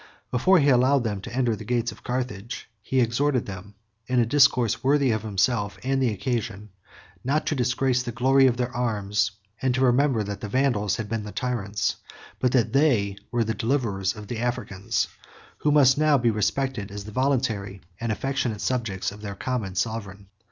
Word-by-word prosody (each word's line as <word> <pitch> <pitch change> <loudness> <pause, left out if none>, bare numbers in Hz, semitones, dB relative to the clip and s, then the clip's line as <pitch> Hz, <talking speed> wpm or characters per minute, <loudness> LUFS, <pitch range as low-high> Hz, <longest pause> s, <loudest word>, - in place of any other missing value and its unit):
Before 185 +10 +4
he 145 -3 +4
allowed 130 +1 +4
them 105 -4 -2
to 120 - -8
enter 125 -3 +1
the - - -9
gates 120 -1 0
of - - -15
Carthage, 120 -3 -4
he 130 +4 +1
exhorted 125 +2 +1
them, 100 +1 -9 0.3
in 125 -1 +2
a 120 - +4
discourse 125 -3 +3
worthy 140 -1 +3
of 110 -1 0
himself 105 0 0
and 135 +1 0
the 130 - +3
occasion, 105 -1 -3 0.5
not 150 +4 0
to 150 - 0
disgrace 125 0 +1
the 125 -1 -4
glory 130 +3 +4
of 120 -2 +1
their 125 0 -2
arms; 105 -3 0 0.3
and 130 -2 +1
to 130 - 0
remember 125 -2 +3
that 100 0 -6
the 105 - -5
Vandals 120 -5 +1
had 110 -3 -4
been 110 0 -3
the 105 - -7
tyrants, 110 -5 -2 0.4
but 125 -2 +2
that 115 -3 +2
they 120 -9 +3
were 120 -1 +1
the 110 0 -1
deliverers, 110 -5 -1
of 105 -1 -9
the 115 0 -4
Africans, 120 -5 -1 0.5
who 150 - +2
must 145 -2 +5
now 155 -2 +4
be 120 -2 +2
respected 110 +1 -1
as 100 0 -7
the 105 - -8
voluntary 110 -7 -1 0.2
and 115 -1 -2
affectionate 120 -3 -2
subjects 115 -8 -1
of 105 +1 -11
their 100 -2 -6
common 110 -7 -3
sovereign. 100 -2 -3
120 Hz, 185 wpm, -25 LUFS, 105-130 Hz, 0.5 s, must